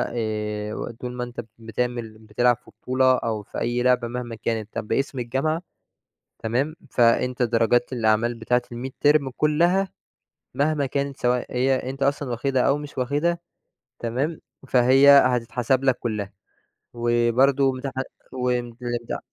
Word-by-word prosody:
آآ، 105 Hz, -2 st, -3 dB
"وطول 125 Hz, +2 st, -6 dB
ما 125 Hz, 0 st, -3 dB
أنت 120 Hz, -1 st, -6 dB, 0.2 s
بتعمل 115 Hz, -1 st, -4 dB
بتلعب 115 Hz, +3 st, +1 dB
في -, -, -20 dB
بطولة 130 Hz, 0 st, +3 dB
أو 110 Hz, -3 st, -3 dB
في -, -, -7 dB
أي 120 Hz, +1 st, 0 dB
لعبة 125 Hz, -1 st, +3 dB
مهما 120 Hz, -1 st, -5 dB
كانت 110 Hz, -1 st, -3 dB
طَب 110 Hz, -2 st, -4 dB
باسم 135 Hz, +2 st, -1 dB
الجامعة 135 Hz, +7 st, -1 dB, 0.8 s
تمام 130 Hz, +8 st, -1 dB
فأنت 125 Hz, +1 st, +2 dB
درجات 120 Hz, +1 st, +2 dB
الأعمال 115 Hz, 0 st, +2 dB
بتاعة 120 Hz, +2 st, 0 dB
الميدترم 135 Hz, +3 st, +1 dB
كلّها، 170 Hz, +8 st, +2 dB, 0.7 s
مهما 145 Hz, +1 st, +1 dB
كانت 140 Hz, +1 st, -2 dB
سواء 125 Hz, 0 st, +1 dB
هي 130 Hz, 0 st, +1 dB
أنت 135 Hz, +1 st, -6 dB
أصلًا 140 Hz, -1 st, 0 dB
واخدها 130 Hz, +2 st, 0 dB
أو 140 Hz, +3 st, +2 dB
مش 145 Hz, -2 st, -9 dB
واخدها. 145 Hz, +7 st, 0 dB, 0.6 s
تمام؟ 130 Hz, +8 st, -2 dB, 0.3 s
فهي 130 Hz, +3 st, +6 dB
هتتحسب 130 Hz, -1 st, +3 dB
لك 130 Hz, -2 st, +3 dB
كلّها، 105 Hz, -4 st, -3 dB, 0.6 s
وبرضو 120 Hz, +3 st, +3 dB
امتحان 130 Hz, 0 st, -4 dB, 0.3 s
والامتا" 120 Hz, -1 st, -3 dB
125 Hz, 130 wpm, -24 LUFS, 115-135 Hz, 0.8 s, فهي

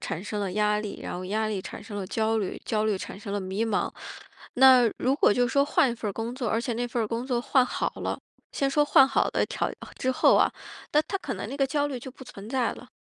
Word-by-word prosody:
产 165 Hz, -, -4 dB
生 210 Hz, 0 st, -4 dB
了 190 Hz, -2 st, -2 dB
压 210 Hz, 0 st, +2 dB
力， 210 Hz, -2 st, -6 dB
然 -, -, -5 dB
后 180 Hz, +1 st, -5 dB
压 215 Hz, +2 st, 0 dB
力 195 Hz, -3 st, -3 dB
产 -, -, -8 dB
生 205 Hz, -1 st, -8 dB
了 190 Hz, -2 st, -4 dB
焦 220 Hz, +2 st, 0 dB
虑， 195 Hz, -3 st, -3 dB
焦 215 Hz, -1 st, 0 dB
虑 205 Hz, -3 st, 0 dB
产 -, -, -7 dB
生 200 Hz, -1 st, -7 dB
了 205 Hz, -, -1 dB
迷 190 Hz, +4 st, -2 dB
茫。 210 Hz, -, 0 dB, 0.7 s
那 255 Hz, -2 st, +7 dB
如 260 Hz, +2 st, +2 dB
果 -, -, +4 dB
就 245 Hz, -1 st, +2 dB
说 280 Hz, +1 st, +3 dB
换 295 Hz, -2 st, +3 dB
一 235 Hz, -, -3 dB
份 220 Hz, -2 st, -4 dB
儿 -, -, -3 dB
工 230 Hz, +4 st, -4 dB
作， 250 Hz, -3 st, -3 dB
而 225 Hz, -, +1 dB
且 240 Hz, 0 st, -2 dB
那 245 Hz, +1 st, -2 dB
份 235 Hz, -1 st, -1 dB
儿 -, -, -1 dB
工 235 Hz, +2 st, -3 dB
作 245 Hz, -3 st, 0 dB
换 255 Hz, +1 st, +3 dB
好 -, -, -2 dB
了 -, -, -3 dB, 0.3 s
先 275 Hz, -1 st, 0 dB
说 295 Hz, +2 st, +3 dB
换 270 Hz, -2 st, +6 dB
好 270 Hz, -, +2 dB
了 -, -, +2 dB
条 -, -, -2 dB, 0.3 s
之 260 Hz, -, 0 dB
后 -, -, +5 dB
啊， -, -, +3 dB, 0.4 s
那 300 Hz, +1 st, +4 dB
它 390 Hz, +5 st, -4 dB
可 -, -, -5 dB
能 -, -, -6 dB
那 280 Hz, -, -5 dB
个 275 Hz, -1 st, +2 dB
焦 290 Hz, +1 st, 0 dB
虑 265 Hz, -, -4 dB
就 255 Hz, -, -9 dB
不 260 Hz, -, -14 dB
存 200 Hz, -3 st, -10 dB
在 255 Hz, -1 st, 0 dB
了， 250 Hz, -, -12 dB
235 Hz, 295 characters per minute, -26 LUFS, 210-265 Hz, 0.7 s, 那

